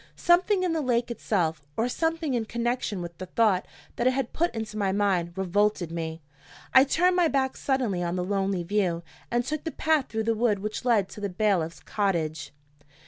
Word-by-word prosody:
Something 370 +2 +3
in 355 -2 +1
the 320 - 0
lake 240 -3 0
itself, 170 -9 -1 0.2
or 230 - +2
something 325 +1 -1
in 235 -2 0
connection 235 -4 -2
with 170 0 -7
the 185 - -6
thought 200 -2 +2 0.3
that 240 - +2
it 255 - +4
had 265 -2 -2
put 340 +2 +1
into 220 -1 -4
my 200 -2 0
mind, 190 -3 0
revolted 190 -2 +1
me. 160 -1 -5 0.5
I 260 +1 +8
turned 360 +6 +3
my 355 -2 +4
back 265 -3 0
suddenly 250 -10 0
on 175 0 -1
the 180 - -1
lonely 195 -2 0
view, 175 -2 0 0.3
and 240 0 0
took 305 +2 -3
the 325 - -2
path 315 -3 +1
through 220 0 -2
the 230 +1 +1
wood 220 -2 +2
which 215 +5 -5
led 220 -6 +3
to 210 - -10
the 200 - -1
bailiff's 180 -4 0
cottage. 165 -7 -1
215 Hz, 195 wpm, -27 LUFS, 185-260 Hz, 0.5 s, I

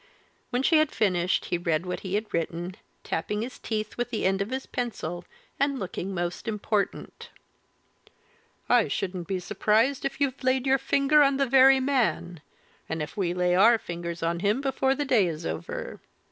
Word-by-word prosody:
When 245 +2 -1
she 320 +3 +4
had 310 -1 +2
finished 180 -4 +1
he 175 - -1
read 165 0 0
what 180 - -3
he 190 0 -4
had 215 +1 -3
written, 170 +2 -3 0.3
tapping 210 +6 -2
his 250 - -8
teeth 215 -1 -4
with 240 0 -2
the 230 -5 -2
end 195 +1 +2
of 200 - -2
his 260 +1 -4
pencil 175 -8 -4 0.3
and 280 0 +1
looking 190 -2 -4
most 175 +1 -4
important. 210 -1 -2 1.4
"I 245 -3 +4
shouldn't 180 -3 -3
be 190 -2 -1
surprised 225 +8 +1
if 275 - -3
you've 275 -2 -1
laid 260 0 +1
your 270 0 +3
finger 280 +3 +3
on 275 -1 +4
the 275 - +2
very 265 +1 +6
man 250 - 0 0.5
and 160 - -2
if 150 -1 -5
we 180 -3 -1
lay 180 0 +2
our 220 +6 +6
fingers 170 -3 -6
on 170 +1 0
him 205 +6 +1
before 270 -1 +1
the 290 +1 -2
day 225 -9 +3
is 160 -2 -5
over. 80 +1 -5
210 Hz, 180 wpm, -26 LUFS, 175-265 Hz, 1.4 s, very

